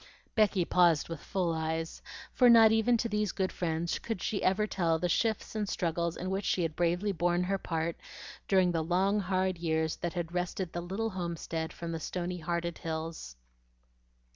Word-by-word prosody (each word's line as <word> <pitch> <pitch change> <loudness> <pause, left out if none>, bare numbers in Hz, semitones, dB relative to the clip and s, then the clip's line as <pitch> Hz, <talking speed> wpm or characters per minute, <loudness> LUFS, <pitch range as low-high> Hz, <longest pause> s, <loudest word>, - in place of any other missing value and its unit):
Becky 205 -5 +3
paused 170 -4 +3
with 165 -2 -5
full 180 -2 -1
eyes, 160 0 -3 0.3
for 250 -2 +6
not 225 -2 +8
even 225 +2 +3
to 230 - -1
these 210 -2 0
good 190 -2 -1
friends 170 -1 -2
could 225 -5 -4
she 200 +3 -2
ever 195 +3 +2
tell 170 -6 +1
the 180 - -1
shifts 220 +4 0
and 210 -2 -2
struggles 170 -1 -1
in 185 +2 -3
which 195 +1 -1
she 180 - +1
had 160 -2 -2
bravely 175 +4 +1
borne 175 0 +1
her 195 +2 -1
part 165 -1 -2 0.5
during 185 -2 +4
the 165 -2 0
long 190 +5 +2
hard 185 -2 0
years 160 -1 0
that 175 -1 -3
had 175 -1 -4
wrested 180 0 -2
the 175 - -3
little 200 +6 -3
homestead 170 -2 -4
from 170 -1 -6
the 165 - -3
stony 180 +2 -3
hearted 170 0 -2
hills. 160 - -5
175 Hz, 185 wpm, -30 LUFS, 165-195 Hz, 0.5 s, not